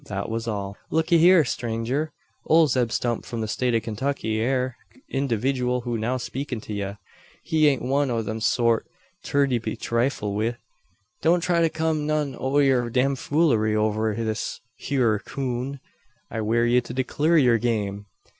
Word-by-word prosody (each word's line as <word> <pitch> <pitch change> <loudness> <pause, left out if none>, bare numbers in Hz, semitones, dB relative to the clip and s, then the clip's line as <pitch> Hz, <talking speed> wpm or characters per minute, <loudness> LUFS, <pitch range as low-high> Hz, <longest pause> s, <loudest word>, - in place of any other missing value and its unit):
That 100 +1 -4
was 115 +1 -3
all. 100 -2 -3
"Lookee 160 +1 +3
hyur, 175 0 +7
strenger! 120 +4 -2 0.4
Ole 160 0 +6
Zeb 125 -5 +1
Stump 120 -1 -1
from 115 -1 -5
the 110 - -2
State 125 +2 0
o' - - +4
Kintucky, 110 0 -2
air 130 +1 0 0.2
the 260 - -23
individooal 125 -1 0
who's 120 -2 -2
now 125 +4 0
speakin' 130 0 -4
to 105 - -7
ye. 100 -1 -3 0.5
He 155 -1 +3
ain't 135 -4 +1
one 140 +2 +1
o' 115 -2 -1
thet 110 +1 -4
sort 115 0 +2 0.4
ter 140 0 +2
be 120 -5 -2
trifled 115 -3 -1
wi'. 110 +3 0 0.7
Don't 170 +2 +3
try 170 0 +2
to 165 - +3
kum 160 -1 -1
none 150 -3 0
o' 135 +3 -1
yer 130 -4 +3
damfoolery 130 -2 +2
over 110 0 +1
this 110 -1 -3 0.2
hyur 120 -7 +1
coon. 130 +3 -4 0.5
I 110 - -2
warn 115 +2 +2
ye 125 +1 +4
to 120 0 -8
declur 150 +6 +2
yur 120 -4 +4
game. 105 -3 -2
125 Hz, 165 wpm, -24 LUFS, 110-140 Hz, 0.7 s, hyur